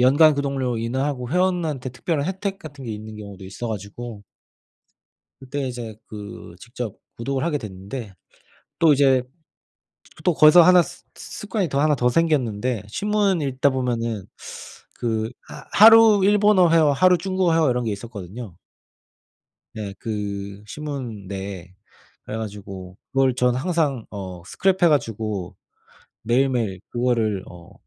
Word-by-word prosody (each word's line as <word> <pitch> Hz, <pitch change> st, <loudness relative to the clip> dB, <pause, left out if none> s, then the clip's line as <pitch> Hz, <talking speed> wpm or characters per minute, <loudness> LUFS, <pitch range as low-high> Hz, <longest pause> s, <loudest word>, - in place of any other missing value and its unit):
연간 145 Hz, +5 st, +6 dB
구독료 135 Hz, -4 st, -1 dB
인하하고 125 Hz, +2 st, -2 dB
회원한테 175 Hz, -7 st, 0 dB
특별한 145 Hz, +3 st, -2 dB
혜택 195 Hz, +1 st, -3 dB
같은 145 Hz, -7 st, -10 dB
게 115 Hz, -, -5 dB
있는 110 Hz, 0 st, -8 dB
경우도 100 Hz, -2 st, -10 dB
있어 105 Hz, +5 st, -6 dB
가지고 105 Hz, +1 st, -6 dB, 1.2 s
그때 135 Hz, +1 st, -4 dB
이제 120 Hz, -3 st, -6 dB
그 105 Hz, -4 st, -9 dB
직접 115 Hz, 0 st, -6 dB, 0.2 s
구독을 135 Hz, +4 st, -2 dB
하게 155 Hz, -3 st, 0 dB
됐는데 100 Hz, 0 st, -7 dB, 0.7 s
또 160 Hz, -3 st, +6 dB
이제 135 Hz, -2 st, +4 dB
그 125 Hz, -, -23 dB, 0.9 s
또 180 Hz, -, +3 dB
거기서 155 Hz, +4 st, +8 dB
1 180 Hz, +1 st, +7 dB
스 175 Hz, +1 st, -11 dB
습관이 205 Hz, -4 st, -3 dB
더 140 Hz, -, +1 dB
1 150 Hz, 0 st, +3 dB
더 125 Hz, -, +2 dB
생겼는데 125 Hz, -7 st, +1 dB
신문 200 Hz, -, +1 dB
읽다 135 Hz, 0 st, +1 dB
보면은 115 Hz, -5 st, -2 dB, 0.7 s
그 110 Hz, -1 st, -2 dB, 0.2 s
하 -, -, -10 dB
하루 225 Hz, -1 st, +8 dB
일본어 205 Hz, -2 st, +5 dB
회화 160 Hz, -3 st, +5 dB
하루 180 Hz, +6 st, +5 dB
중국어 185 Hz, -1 st, 0 dB
회화 160 Hz, -3 st, +3 dB
이런 125 Hz, -1 st, 0 dB
게 110 Hz, -, -1 dB
있었거든요. 100 Hz, -1 st, -8 dB, 1.2 s
네. 105 Hz, -3 st, -5 dB
그 100 Hz, -2 st, -5 dB
신문 130 Hz, -8 st, -6 dB
내에. 95 Hz, -2 st, -7 dB, 0.5 s
그래 110 Hz, -, -5 dB
가지고 100 Hz, -4 st, -7 dB, 0.2 s
그걸 135 Hz, -2 st, +3 dB
전 125 Hz, 0 st, +2 dB
항상 145 Hz, -5 st, 0 dB
어 95 Hz, -4 st, -7 dB
스크랩해 185 Hz, -, +2 dB
가지고 110 Hz, -, -1 dB, 0.7 s
매일매일 120 Hz, -5 st, +1 dB
그거를 115 Hz, -5 st, 0 dB
어 90 Hz, +2 st, -13 dB
125 Hz, 275 characters per minute, -23 LUFS, 105-155 Hz, 1.2 s, 거기서